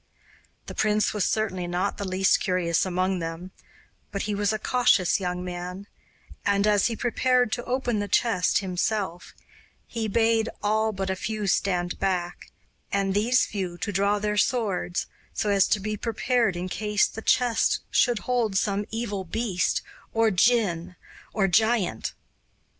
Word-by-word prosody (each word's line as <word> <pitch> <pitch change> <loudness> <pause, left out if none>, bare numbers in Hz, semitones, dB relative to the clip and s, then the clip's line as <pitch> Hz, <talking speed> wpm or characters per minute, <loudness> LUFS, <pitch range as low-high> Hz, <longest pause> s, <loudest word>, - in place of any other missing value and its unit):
The - - -7
prince 215 0 +1
was 210 -3 0
certainly 185 -5 -1
not 180 +3 -2
the 200 - -3
least 190 +1 +3
curious 180 -1 +1
among 185 +1 0
them; 165 +2 -6 0.6
but 200 - -3
he 210 - -2
was 205 0 +1
a 215 - -1
cautious 215 -6 +3
young 180 -1 -3
man, 180 +2 -6 0.6
and, 200 0 +2
as 210 -1 +3
he 235 - -2
prepared 250 0 +1
to 240 - -2
open 245 -3 -1
the 205 - -2
chest 200 -6 +2
himself, 185 -1 -2 0.5
he 225 -2 -3
bade 225 +1 +2
all 220 +1 +2
but 195 -2 -3
a - - -1
few 215 +2 -3
stand 180 -2 0
back, 180 -2 -2 0.4
and 195 -1 0
these 230 +5 +3
few 185 -4 -4
to 205 - -3
draw 200 +2 +2
their 210 0 -1
swords, 205 -7 0 0.3
so 210 - 0
as 195 -2 +4
to 210 - +2
be 215 +2 -3
prepared 230 -1 0
in 175 +1 -3
case 210 +2 +1
the 225 - -6
chest 240 0 +2
should 240 -2 +3
hold 240 -5 0
some 200 0 0
evil 220 -4 -3
beast, 195 0 -1 0.3
or 225 -1 +3
djinn, 185 -4 +2 0.4
or 205 -3 +1
giant. 210 - +1
200 Hz, 155 wpm, -26 LUFS, 185-220 Hz, 0.6 s, as